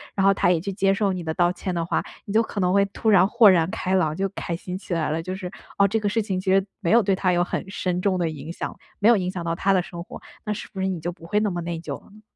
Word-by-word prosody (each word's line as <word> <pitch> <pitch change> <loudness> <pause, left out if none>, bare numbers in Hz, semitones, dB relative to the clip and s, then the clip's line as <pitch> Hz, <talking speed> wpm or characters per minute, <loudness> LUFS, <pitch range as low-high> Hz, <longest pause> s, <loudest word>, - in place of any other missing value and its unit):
然 195 - +2
后 195 - +6
他 175 - +2
也 175 - +3
去 195 +4 -4
接 195 0 +2
受 195 -1 +1
你 180 -1 -4
的 160 - -2
道 175 0 +3
歉 180 0 -4
的 170 -1 -1
话， - - 0 0.2
你 200 - -5
就 220 - +5
可 220 - -4
能 180 -1 +2
会 200 0 +5
突 215 +2 0
然 190 -2 +6
豁 235 +1 +6
然 175 -4 +5
开 185 0 -2
朗， 160 -5 +2
就 195 +3 0
开 175 -3 -4
心 180 +1 -6
起 185 -2 -4
来 160 -2 0
了。 160 +1 -1
就 185 +3 -4
是 185 -2 -6 0.3
哦， 200 0 +5
这 220 +3 0
个 205 - 0
事 225 +2 0
情 195 -3 -2
其 190 0 0
实 195 0 +4
没 185 -7 -2
有 230 +3 +5
对 195 -1 +2
他 185 -1 +1
有 175 0 +2
很 180 - -4
深 180 -2 -2
重 190 -1 +1
的 175 -2 0
影 155 +1 -7
响， - - -5 0.2
没 210 - +2
有 235 - +7
影 180 -2 -1
响 180 -2 -5
到 165 - 0
他 190 +3 +1
的 185 -2 +3
生 170 0 -8
活， - - -10 0.3
那 - - 0
是 210 - -4
不 190 - -4
是 190 - +1
你 185 -3 -2
就 175 +3 -3
不 165 -1 -13
会 205 +4 +2
那 210 -1 0
么 175 -1 -3
内 170 -1 -4
疚 150 -4 -6
了 - - -20
呢？ 210 +1 -17
185 Hz, 355 characters per minute, -24 LUFS, 175-200 Hz, 0.3 s, 有